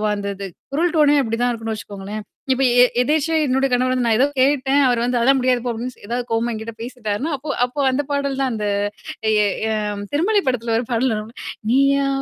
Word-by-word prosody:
அந்த 200 0 -4
இது. 195 0 -6 0.3
குரல் 335 +5 +1
டோனே 295 -2 +5
அப்பிடி 230 -2 -2
தான் 245 0 +2
இருக்குன்னு 225 -1 -4
வச்சுக்கோங்களேன். 205 0 -7 0.3
இப்ப 270 +1 0 0.2
எ - - +8 0.2
எதேச்சே 310 +4 +1
என்னோட 265 +1 +1
கணவர் 255 +1 +2
வந்து 250 -2 0
நான் 220 -1 +3
ஏதோ 275 - +5
கேட்டேன். 275 0 +3
அவர் 240 -1 +1
வந்து 245 0 +1
அதான் 270 +3 +4
முடியாது 250 -1 +2
போ! - - 0
அப்பிடின்னு 235 -1 -7
ஏதாவது 240 +1 -2
கோவமா 230 +1 0
என்கிட்ட 220 +1 -6
பேசிட்டாருன்னா, 245 +3 -3
அப்போ, 285 +3 -9 0.2
அப்போ 250 +4 -7
அந்த 285 +3 0
பாடல் 280 -1 -1
தான் 260 -2 +1
அந்த 210 -1 -2 0.6
எ 210 -1 +3 0.3
அ - - 0 0.4
திருமலை 400 +7 +2
படத்துல 230 -2 -1
ஒரு 240 - -3
பாடல் 235 0 +1
வரும்ல 215 +2 -7 0.3
நீயா 275 +1 +3
250 Hz, 200 wpm, -20 LUFS, 225-275 Hz, 0.6 s, எ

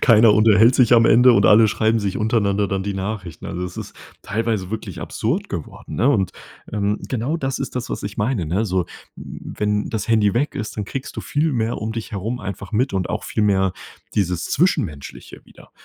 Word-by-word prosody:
keiner 110 -2 +6
unterhält 110 +3 +5
sich 125 -2 +4
am 115 -1 +6
Ende 125 +2 +6
und 100 - +4
alle 110 +1 +6
schreiben 110 +2 +1
sich 100 -2 -2
untereinander 105 -2 +1
dann 95 0 -2
die 100 - -3
Nachrichten. 95 -3 -5
Also, 90 +1 -4
das 90 - -6
ist - - -7 0.3
teilweise 110 -3 -2
wirklich 110 - -5
absurd - - -2
geworden, - - -7
ne? 120 +8 +2
Und, 95 -8 +1 0.4
ähm, 105 0 0
genau 130 +6 -1
das 135 -4 -3
ist 135 - -4
das, 125 - -3
was - - -4
ich 100 +1 -6
meine, 105 - -1
ne? 95 +8 0
So, 95 -4 0 0.3
wenn 105 0 -3
das 110 0 -3
Handy 110 -2 +3
weg 140 +5 0
ist, 105 - -5
dann 105 - -2
kriegst 135 +6 -6
du - - -3
viel 150 +2 0
mehr 115 -1 -1 0.2
dich 115 - -5
herum 110 +4 -4
einfach 100 +2 -7
mit 125 +6 +1
und 95 -2 -1
auch - - -3
viel 105 - -1
mehr 95 -2 +2 0.4
dieses 90 -3 0
Zwischenmenschliche 80 - -2
wieder. - - -18
105 Hz, 200 wpm, -21 LUFS, 100-115 Hz, 0.4 s, keiner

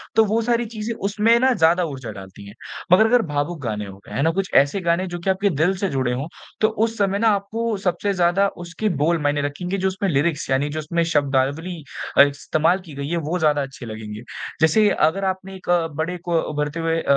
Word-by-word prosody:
तो 220 - +6
वो 220 +2 +1
सारी 235 +1 +1
चीज़ें 220 +1 -3
उसमें 215 +3 +3
ना 260 +1 +4
ज़्यादा 175 -3 +3
ऊर्जा 130 -7 -6
डालती 95 0 -11
हैं। 100 - -11 0.4
मगर 210 +5 +7
अगर 245 +1 +4
भावुक 145 +2 -2
गाने 105 -4 -3
हो 95 0 -10
गए - - -11
हैं 135 - 0
ना 165 - +3
कुछ 195 +2 -2
ऐसे 145 +8 +4
गाने 170 +2 +1
जो 175 - -3
कि 170 - -2
आपके 195 +2 +2
दिल 180 +4 +3
से 195 +1 -1
जुड़े 130 -4 0
हो 135 +4 -3 0.3
तो 215 - +5 0.2
उस 225 0 -5
समय 200 -1 +1
ना 225 - +3
आपको 220 +3 -2
सबसे 200 +3 0
ज़्यादा 180 +2 +3 0.2
उसके 170 +6 -2
बोल 170 +2 +2
माने 145 0 +1
रखेंगे, 175 +7 -3
जो 190 0 0
उसमे 190 +1 -1
लिरिक्स 150 -1 0
यानी 135 +2 +1
जो 155 +1 -4
उसमें 170 +2 -1
शब्दावली 145 +5 0 0.4
अ, - - +10
इस्तेमाल 155 +5 +1
की 155 - -11
गई 140 0 -4
है 170 - 0
वो 180 +2 -1
ज़्यादा 150 -3 +2
अच्छी 135 -2 -7
लगेंगे। 110 -1 -7 0.4
जैसे 205 +7 +5 0.2
अगर 195 +5 -1
आपने 190 0 -3
एक 185 - -11 0.3
बड़े 165 +4 -2
को 170 -1 0
उभरते 150 +1 -3
हुए 165 0 0
अ, - - -9
170 Hz, 225 wpm, -22 LUFS, 145-195 Hz, 0.4 s, अ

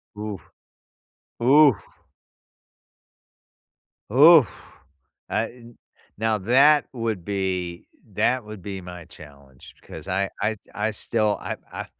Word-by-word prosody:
Ooh, 105 -1 -6 1.0
oof! 135 -2 +5 2.3
Oof, 145 - +5 0.5
I 105 - 0
n 120 -1 -17 0.4
now 110 -1 0
that 135 +8 +4
would 115 -8 -4
be 95 -3 -3 0.3
that 125 -2 +1
would 105 -3 -10
be 95 -1 -6
my 90 -1 -10
challenge 70 -5 -16
because - - -11
I 95 +1 -1
I 110 +1 0 0.2
I 105 +1 -1
still 110 0 -1
I - - -5 0.2
I - - -6
105 Hz, 105 wpm, -23 LUFS, 95-120 Hz, 2.3 s, oof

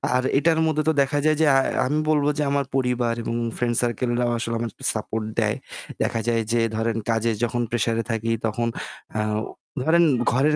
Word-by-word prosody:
আর 130 - +2
এটার 160 +2 +3
মধ্যে 155 -1 +1
তো - - +5
দেখা 140 +1 +1
যায় 155 -1 +3
যে - - +5
আ - - +6 0.3
আমি 150 +4 +1
বলবো 150 -1 +3
যে 150 - +1
আমার 140 -1 +1
পরিবার 125 -2 +1
এবং 115 - -2 0.2
friend 120 -1 0
circle 120 0 -1
রাও 120 -1 +1
আসলে 115 0 -2
আমাকে 115 -3 -4 0.2
support 110 0 -3 0.2
দেয়। - - +1 0.5
দেখা 115 - 0
যায় 115 -1 +2
যে 120 - +2 0.2
ধরেন 115 0 0
কাজে 115 0 +2
যখন 120 +1 0
pressure 115 -1 0
এ - - -7
থাকি 115 0 -1
তখন 115 +2 -1 0.5
আ - - +2 0.6
ধরেন 170 +3 +4 0.3
ঘরের 145 +5 +3
120 Hz, 195 wpm, -23 LUFS, 115-145 Hz, 0.6 s, আ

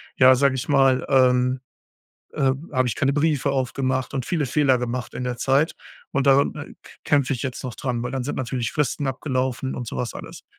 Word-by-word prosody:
ja, 130 -1 +7
sage 135 0 +2
ich 130 - -4
mal 135 -2 +3
ähm, 125 -1 +3 0.7
äh 135 -1 +2 0.2
habe 130 -1 +1
ich - - -2
keine 140 0 +1
Briefe 145 -2 +1
aufgemacht 130 0 -1
und 130 -3 -2
viele 160 -5 -1
Fehler 130 -1 +2
gemacht 125 0 -4
in 125 - -5
der 125 -1 -3
Zeit. 135 +5 +1 0.4
Und 140 -2 0
daran 140 +1 +4
k - - -11
kämpfe 140 -1 +2
ich 125 - -6
jetzt 130 -2 -4
noch 125 -3 -5
dran, 125 -3 -3
weil 125 - -4
dann 130 -2 -2
sind 145 - -3
natürlich 125 -2 -2
Fristen 145 -1 -1
abgelaufen 130 -1 -2
und 125 - -5
so - - -6
was 125 - -3
alles. - - -10
130 Hz, 205 wpm, -23 LUFS, 125-140 Hz, 0.7 s, ja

